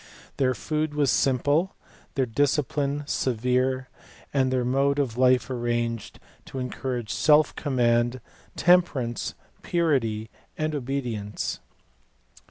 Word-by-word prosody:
Their 130 -2 +2
food 155 +1 -2
was 145 -4 +3
simple; 145 +7 +2 0.4
their 135 -2 +2
discipline 145 +3 0
severe; 130 +1 0 0.5
and 130 -2 +2
their 130 -1 +1
mode 140 +3 +2
of 135 -6 0
life 130 0 +4
arranged 120 -2 -2 0.3
to - - -8
encourage 125 -2 -3
self 150 0 +4
command, 120 -3 +1 0.4
temperance, 155 -10 +2 0.3
purity, 120 -11 0 0.3
and 155 0 -1
obedience. 125 -7 -3
130 Hz, 100 wpm, -26 LUFS, 120-145 Hz, 0.5 s, life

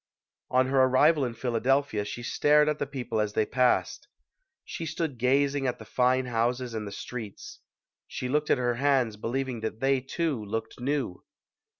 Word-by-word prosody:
On 130 +1 +3
her 135 0 +3
arrival 140 +4 +4
in 120 -2 -4
Philadelphia 125 0 0
she 120 +3 -6
stared 150 +4 +3
at 150 0 0
the - - -2
people 125 -5 -3
as 105 -1 -2
they 110 - +2
passed. 125 +1 +1 0.6
She 170 - -6
stood 155 -5 -3
gazing 135 +2 +2
at 125 -1 -1
the - - -11
fine 130 +1 +2
houses 120 +1 -1
and 110 -2 -4
the - - -6
streets. 125 - -8 0.5
She 125 - -4
looked 150 +3 0
at - - +4
her 120 -1 0
hands, 135 -6 +2
believing 125 +3 -3
that 110 0 -4
they, 135 +1 +2
too, 135 -2 -2
looked 110 +3 -5
new. 135 -7 -2
130 Hz, 175 wpm, -27 LUFS, 115-140 Hz, 0.6 s, arrival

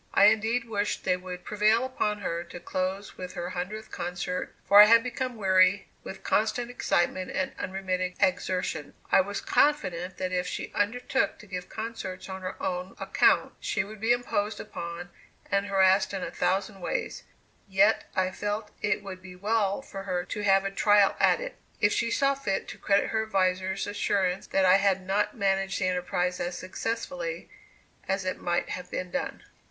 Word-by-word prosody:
I 200 - +7
indeed 225 +2 -1
wished 205 -2 -1
they 185 - +2
would 180 0 -8
prevail 215 +4 +3
upon 210 -5 -1
her 170 -2 -2
to 175 - -9
close 185 +3 -3
with 180 0 -6
her 175 -1 -4
hundredth 205 +5 -5
concert, 180 +1 -4
for 205 +1 +10
I - - +11
had 230 +1 +6
become 250 0 -3
weary 190 -1 +3
with 195 - -8
constant 235 +3 0
excitement 185 -5 0
and 185 - -2
unremitting 185 -1 -2
exertions. 180 -5 0 0.2
I - - +7
was 200 +1 -4
confident 185 - +1
that 185 -1 -2
if 180 0 -1
she - - -4
undertook 245 +6 0
to - - -14
give 180 -2 -6
concerts 220 -5 -6
on 190 0 -6
her 185 - -4
own 180 +1 -3
account, - - +3
she 210 - -1
would 210 +2 -10
be 225 +2 +2
imposed 220 -3 0
upon 170 0 -6 0.4
and 200 0 +1
harassed 195 0 +3
in 190 - -3
a - - -4
thousand 190 +2 -1
ways; - - -3 0.5
yet 200 +3 +3
I 185 0 +1
felt 210 +2 -3
it 205 -1 0
would 190 -2 -8
be 185 0 -11
well 205 +3 0
for 195 -7 -7
her 180 -2 -1
to 210 - -4
have 195 -1 +4
a 195 - -1
trial 205 0 +4
at - - +4
it, - - -6 0.2
if 205 0 +3
she 230 - +1
saw 275 +3 +2
fit 270 -8 -2
to - - -9
credit 200 0 +2
her 220 - +1
advisers' 190 -2 0
assurance 195 -2 0
that 195 -1 +2
I 185 +1 +7
had 195 -2 +1
not 205 +3 0
managed 195 -1 +1
the 185 - +1
enterprise 180 0 -1
as 175 0 -3
successfully 370 - -4 0.6
as 190 0 -1
it 185 - -3
might 175 0 0
have 180 -1 -5
been 180 -1 -4
done. 275 - -3
195 Hz, 180 wpm, -28 LUFS, 185-210 Hz, 0.6 s, I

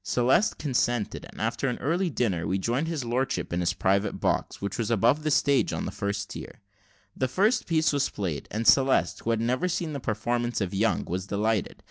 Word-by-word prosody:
Celeste 125 - +2
consented, 120 -5 -1
and - - -13
after - - -1
an 125 - -1
early 175 +6 0
dinner, 95 - -1
we 95 - +1
joined 120 +10 -1
his 155 -6 -3
lordship 125 -4 -1
in 85 - 0
his 90 - +1
private 100 +2 +1
box, - - -1
which 100 +3 -4
was 115 - -1
above 120 +6 +3
the 155 - -1
stage, 140 -1 +3
on - - -3
the - - -4
first 100 0 -3
tier. - - -8 0.6
The 130 - 0
first 200 - +1
piece 160 -2 +2
was 140 -1 +1
played, 90 -8 -4
and 110 +2 -3
Celeste, 130 -6 +4
who - - -4
had 115 -1 +2
never 125 +9 0
seen 165 -3 -2
the 140 - -3
performance 120 +1 -1
of 95 -3 -2
Young, 105 +4 +1
was 90 +2 -4
delighted. 105 0 0
120 Hz, 205 wpm, -27 LUFS, 100-140 Hz, 0.6 s, Celeste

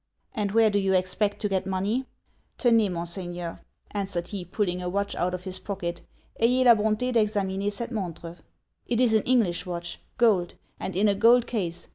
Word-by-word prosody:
'And 205 -4 -2
where 225 -1 +5
do 205 - +2
you 195 -1 +1
expect 185 +3 +1
to 210 - +1
get 190 -1 -1
money?' 205 +7 -1 0.5
'Tenez, 230 -5 +3
mon 170 -1 -3
Seigneur,' 175 -1 -5 0.3
answered 190 -4 -3
he, 200 -3 -5
pulling 180 0 -2
a 180 - -3
watch 200 +2 -1
out 180 +1 -1
of 180 - -8
his 185 -1 -5
pocket, 175 -4 -4 0.4
'ayez 250 +3 +4
la 240 - +9
bonté 220 +3 0
d'examiner 205 -3 +1
cet 235 +4 -4
montre. 175 -5 -5 0.5
It 235 -1 0
is 245 -3 +4
an 220 - +4
English 205 -8 +1
watch. 175 -1 -5 0.2
Gold; 205 -8 +3 0.2
and 190 - -5
in 205 +3 +3
a 200 - +4
gold 230 +4 +5
case. 180 -7 -3
200 Hz, 185 wpm, -26 LUFS, 180-220 Hz, 0.5 s, la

